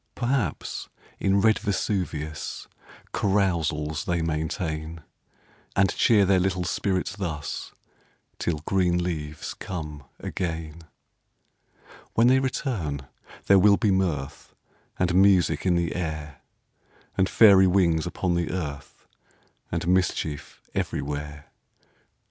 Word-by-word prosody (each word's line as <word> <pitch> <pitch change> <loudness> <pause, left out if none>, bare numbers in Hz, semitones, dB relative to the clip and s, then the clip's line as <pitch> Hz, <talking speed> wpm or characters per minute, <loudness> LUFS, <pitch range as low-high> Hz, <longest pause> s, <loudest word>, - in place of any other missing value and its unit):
Perhaps, 130 +2 -2 0.3
in 95 +1 +2
red 110 0 +4
Vesuvius 95 -7 -3 0.5
Carousals 80 -7 0
they 85 -1 0
maintain; 80 0 -3 0.7
And 100 -1 +3
cheer 105 -4 +4
their 95 0 +4
little 90 -1 0
spirits 95 +1 -1
thus, 80 -8 -4 0.7
Till 80 -4 -1
green 90 -2 +2
leaves 75 -4 -4
come 75 -6 -6 0.2
again. 80 -2 -4 1.3
When 115 - +5
they 130 +2 +5
return, 115 - -2 0.4
there 100 -1 +6
will 100 +1 +6
be 105 - +2
mirth 85 -8 -2 0.4
And 90 -1 +1
music 95 -1 +4
in 90 - +3
the 85 0 0
air, 75 -4 -4 0.7
And 95 0 +2
fairy 100 -4 +7
wings 90 -3 +2
upon 90 0 -1
the 85 -1 0
earth, 75 -6 -6 0.7
And 85 +1 -2
mischief 90 -5 -1
everywhere. 75 0 -4
90 Hz, 105 wpm, -26 LUFS, 80-95 Hz, 1.3 s, fairy